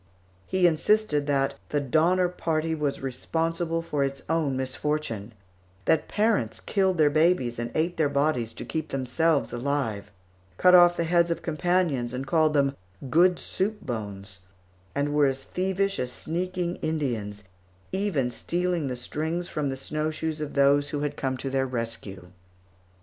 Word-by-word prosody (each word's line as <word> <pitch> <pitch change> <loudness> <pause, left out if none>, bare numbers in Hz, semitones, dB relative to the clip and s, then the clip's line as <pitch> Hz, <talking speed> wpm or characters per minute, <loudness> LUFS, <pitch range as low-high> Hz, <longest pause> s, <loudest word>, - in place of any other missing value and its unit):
_ - - -33 0.4
He 185 -1 +2
insisted 165 -2 +2
that 135 -1 +1 0.2
the 150 - +1
Donner 165 +7 +3
Party 165 -2 -1
was 150 -3 -2
responsible 165 +5 -2
for 150 -4 -1
its 135 0 -3
own 155 -5 0
misfortune; 130 -5 -3 0.5
that 160 - +2
parents 215 0 +1
killed 190 -3 +1
their 150 -2 +4
babies 155 -7 +2
and 120 0 -2
ate 170 +3 0
their 155 -3 +2
bodies 140 -5 +1
to - - -7
keep 160 -1 -3
themselves 140 +4 +1
alive; 120 -5 -2 0.5
cut 180 - +5
off 175 -1 +7
the 170 - +1
heads 170 +1 +3
of 170 - -2
companions 165 -7 0
and 130 +2 -4
called 155 +1 +2
them 140 -1 +2 0.4
good 175 +3 +5
soup 210 +3 -2
bones; 100 - -6 0.6
and 145 +1 0
were 145 -1 +4
as 135 0 -2
thievish 190 +2 -1
as 125 -1 -2
sneaking 175 +4 -3
Indians, 115 -10 -3 0.5
even 185 -11 0
stealing 175 +3 -1
the 125 - -3
strings 160 +7 -3
from 150 -2 -1
the 135 - -3
snowshoes 155 +2 -3
of 150 - -5
those 140 +1 +4
who 145 - -3
had 145 -1 -2
come 130 -1 -2
to 135 +1 -4
their 135 0 +1
rescue. 115 -7 -5
150 Hz, 155 wpm, -26 LUFS, 135-170 Hz, 0.6 s, off